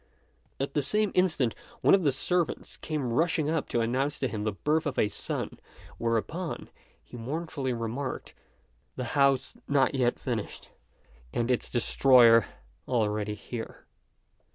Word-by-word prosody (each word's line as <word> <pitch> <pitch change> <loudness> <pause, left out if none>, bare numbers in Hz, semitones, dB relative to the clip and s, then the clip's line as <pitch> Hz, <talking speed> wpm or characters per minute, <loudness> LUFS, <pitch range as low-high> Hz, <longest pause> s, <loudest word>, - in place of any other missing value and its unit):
At 135 0 -2
the 145 - +2
same 210 +7 +2
instant 155 -10 +2 0.3
one - - +5
of 195 - +6
the 145 - +3
servants 175 +5 -1
came 140 -7 -3
rushing 155 +1 +1
up 160 -3 -1
to 120 - +1
announce 130 +5 0
to 130 - 0
him 110 -3 -4
the 110 - +1
birth 150 +9 0
of 140 - -3
a - - +3
son; 105 - -4 0.4
whereupon, 115 +10 -2 0.3
he 125 - -11
mournfully 140 +2 -3
remarked, 120 +3 -4 0.6
"The 130 - -3
house 140 -3 +3
not 140 -2 +3
yet 125 -3 +1
finished, 115 -5 -5 0.6
and 120 +1 0
its 125 - 0
destroyer 120 -2 +5 0.4
already 105 -3 0
here." 110 +2 -8
130 Hz, 140 wpm, -28 LUFS, 115-150 Hz, 0.6 s, of